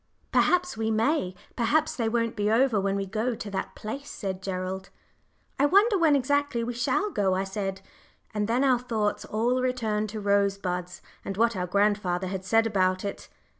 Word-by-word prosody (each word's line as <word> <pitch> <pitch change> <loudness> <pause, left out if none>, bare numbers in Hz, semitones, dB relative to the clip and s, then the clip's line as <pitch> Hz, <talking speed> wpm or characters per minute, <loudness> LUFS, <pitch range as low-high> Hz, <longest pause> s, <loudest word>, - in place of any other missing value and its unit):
"Perhaps 360 -3 +2
we 220 0 0
may 220 - +1 0.2
perhaps 300 +6 +1
they 230 -3 0
won't 230 0 0
be 210 -1 0
over 230 -2 +3
when 195 0 0
we 200 0 -1
go 220 +5 -1
to 210 -2 -7
that 195 - -4
place," 275 +7 -6
said 190 -2 -5
Gerald. 190 0 -4 0.7
"I 285 - +5
wonder 405 +6 +5
when 325 -6 +4
exactly 285 -2 +1
we 240 +1 -3
shall 320 - 0
go?" 195 - +1
I 190 - 0
said. 195 -1 -4 0.5
And 210 -1 -1
then 240 +4 +2
our 255 -3 +4
thoughts 220 -4 -1
all 240 +4 0
returned 220 -4 -1
to 215 +1 -5
Rosebuds, 200 -3 0 0.2
and 195 - -5
what 230 0 +3
our 180 -1 -2
grandfather 200 -2 +1
had 190 0 -4
said 225 +3 +3
about 185 -3 +1
it. 200 - -6
215 Hz, 180 wpm, -27 LUFS, 195-250 Hz, 0.7 s, I